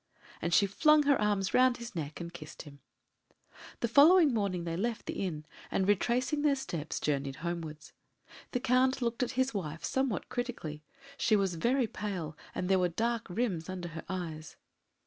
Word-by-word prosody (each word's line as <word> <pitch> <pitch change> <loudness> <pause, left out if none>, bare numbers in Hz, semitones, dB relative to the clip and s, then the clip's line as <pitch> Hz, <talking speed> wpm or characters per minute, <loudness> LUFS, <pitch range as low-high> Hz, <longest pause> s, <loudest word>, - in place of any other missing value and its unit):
and 170 - -1
she 200 - +5
flung 300 +10 +4
her 285 -4 +3
arms 205 -2 +1
round 255 -1 +5
his 235 -1 -8
neck 150 -2 -4
and 170 0 -6
kissed 155 -3 -9
him. 140 -1 -13 1.0
The 235 - +2
following 300 +4 +7
morning 200 -5 -1
they 165 -1 -3
left 225 +5 -2
the - - -3
inn, 155 -5 -4 0.2
and, 190 - 0
retracing 245 +8 +1
their 290 -2 +3
steps, 165 - -4
journeyed 140 -2 -1
homewards. 160 -3 -5 0.6
The 250 - -1
Count 260 +1 +2
looked 235 +1 -1
at 250 - -1
his 260 0 +2
wife 165 -5 -4
somewhat 265 -7 -1
critically; 165 -12 -4 0.3
she 220 - +3
was 195 -3 +1
very 240 +10 +2
pale, 185 -7 -4 0.2
and 180 - -2
there 190 0 +4
were 180 -1 +2
dark 230 +5 -1
rims 185 -4 -2
under 180 -2 -5
her 165 0 -7
eyes. 160 -5 -5
195 Hz, 175 wpm, -31 LUFS, 170-245 Hz, 1.0 s, following